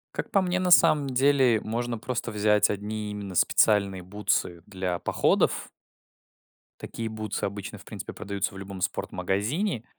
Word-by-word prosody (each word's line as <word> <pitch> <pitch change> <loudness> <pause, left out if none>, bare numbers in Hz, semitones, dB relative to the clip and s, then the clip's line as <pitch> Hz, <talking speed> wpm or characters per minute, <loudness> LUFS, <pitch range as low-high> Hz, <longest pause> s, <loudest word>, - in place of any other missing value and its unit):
Как - - -4
по 195 - +4
мне, 185 0 0
на 180 -1 0
самом 155 -5 +6
деле 130 -3 +3
можно 120 +2 -3
просто 120 0 -4
взять 105 0 +3
одни 105 +1 -4
именно 100 -2 -6
специальные 100 -1 +3
бутсы 90 -3 -2
для 95 -3 -3
походов. - - +1 1.1
Такие 115 - -5
бутсы 110 -1 -4
обычно, 100 0 -6
в - - -15
принципе, - - -7
продаются 100 -1 -3
в - - -10
любом 95 -1 -8
спорт-магазине. 120 - -1
105 Hz, 145 wpm, -26 LUFS, 100-125 Hz, 1.1 s, самом